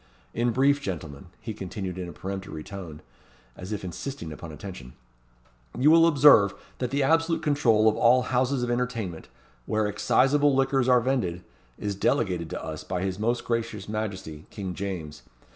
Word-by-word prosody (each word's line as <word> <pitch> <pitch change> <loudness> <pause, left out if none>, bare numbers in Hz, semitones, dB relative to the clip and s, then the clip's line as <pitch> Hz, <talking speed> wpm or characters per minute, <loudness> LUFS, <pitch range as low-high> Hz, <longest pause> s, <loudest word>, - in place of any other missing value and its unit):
In 120 +1 +1
brief, 140 +4 +3
gentlemen," 80 - -6
he 110 - -6
continued 95 -2 -5
in 90 -1 -5
a - - -7
peremptory 95 -2 -6
tone, 85 -6 -9 0.5
as 95 +3 -8
if 105 -2 -3
insisting 95 - -6
upon 80 +1 -9
attention, 75 -6 -9 0.8
"you 145 +4 +5
will 165 0 +7
observe, 140 - +6 0.2
that 125 - -1
the 140 +2 +1
absolute 165 +3 +2
control 120 -7 +3
of 110 - +4
all 125 +2 +4
houses 130 +1 0
of 120 - -1
entertainment, 115 -8 -3 0.4
where 110 0 +1
exciseable 135 +8 +3
liquors 135 -1 +2
are 125 -1 +5
vended, 100 -9 -1 0.3
is 105 -1 -3
delegated 95 -4 0
to - - -5
us 80 -1 -6
by 90 0 -3
his 95 0 -3
most 120 +3 0
gracious 115 -4 -2
Majesty, 95 -8 -5
King 95 -3 -5
James. 85 -6 -5
105 Hz, 160 wpm, -26 LUFS, 90-130 Hz, 0.8 s, will